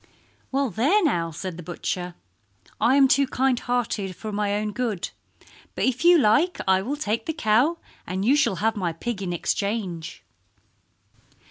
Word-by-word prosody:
"Well, 275 -2 0
there 290 - +2
now!" 170 - +1
said 170 +2 -6
the - - -7
butcher. 175 +1 -4 0.6
"I 260 - +4
am 275 -1 +6
too 275 +1 +3
kind 260 -1 +1
hearted 220 -6 -2
for 215 +4 -6
my 205 0 -1
own 210 0 -2
good, 215 -6 -3 0.6
but - - -2
if 260 0 0
you 350 0 +7
like 300 +8 +3
I 190 0 +4
will 260 +9 -3
take 225 -5 -2
the 320 - -1
cow 285 +3 +2 0.3
and 190 +2 -2
you 265 +5 +5
shall 295 -10 +2
have 225 0 +2
my 180 -5 -2
pig 200 +5 -4
in 185 -2 -3
exchange." 185 -1 -3
215 Hz, 165 wpm, -24 LUFS, 190-265 Hz, 0.6 s, you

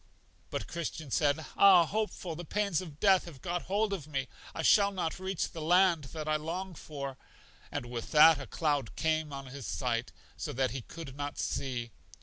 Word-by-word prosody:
But - - -3
Christian 160 -4 -5
said: 145 +2 +2
Ah, 185 -4 +8
Hopeful, 195 -3 -3
the 175 - -6
pains 200 -1 0
of 155 -5 -10
death 195 -3 +5
have 160 -6 -10
got 175 +2 -2
hold 205 +1 +1
of 160 -7 -4
me; 135 -3 -3 0.3
I 160 - -2
shall 200 +4 +6
not 175 -3 -2
reach 190 -1 -2
the 160 - -7
land 175 -1 +4
that 155 +3 -6
I 155 0 +2
long 175 +5 -4
for. 140 -4 -6 0.5
And - - -3
with 120 -1 -5
that 155 -1 +7
a 135 - -7
cloud 145 -8 -1
came 155 -1 0
on 135 -1 -6
his 135 -1 -8
sight, 120 -2 -1 0.2
so - - -5
that 130 -1 +1
he 130 +1 -4
could 140 +1 -9
not 145 0 -4
see. 120 -4 -2
155 Hz, 190 wpm, -31 LUFS, 140-180 Hz, 0.5 s, Ah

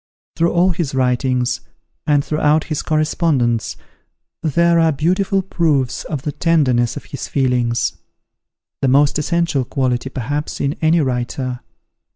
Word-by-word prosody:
Through 170 +1 +2
all 180 +2 +3
his 160 -6 -2
writings, 125 -1 0 0.5
and 145 -2 +3
throughout 150 0 +2
his 155 -2 -3
correspondence, 155 -6 0 0.6
there 170 +1 +3
are 165 -1 +4
beautiful 185 +6 +1
proofs 155 -9 0
of 150 -5 -4
the 150 - -2
tenderness 135 -8 +1
of - - -8
his 140 - -6
feelings, 125 -3 0 0.8
the 135 - +2
most 145 +3 +3
essential 165 -3 0
quality, 130 0 -1
perhaps, 145 +3 -4
in 140 +1 -1
any 160 +1 +3
writer. 125 -1 -2
145 Hz, 130 wpm, -18 LUFS, 130-165 Hz, 0.8 s, are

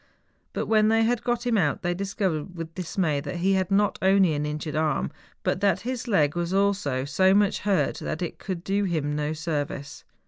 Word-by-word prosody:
But - - -2
when 215 -1 +3
they 225 +1 +4
had 240 +1 +1
got 240 0 -1
him 230 -3 +2
out, 150 -2 0
they 175 0 +1
discovered 185 -3 -2
with 165 -1 -6
dismay 170 -4 -1
that 140 - -5
he 185 +3 +1
had 190 -2 +1
not 200 +1 +2
only 190 -3 +4
an 150 0 -1
injured 150 0 -4
arm, 155 -3 0 0.3
but 185 - 0
that 200 -1 +2
his 250 +2 -4
leg 155 -9 +2
also 175 -5 0
was 140 +3 -6
so 190 +1 +4
much 205 -1 +3
hurt 190 -9 +1
that 160 - -3
it 170 - -5
could 185 -3 -5
do 200 +2 0
him 155 -5 -1
no 150 +1 -1
service. 145 -3 -4
185 Hz, 205 wpm, -26 LUFS, 155-200 Hz, 0.3 s, they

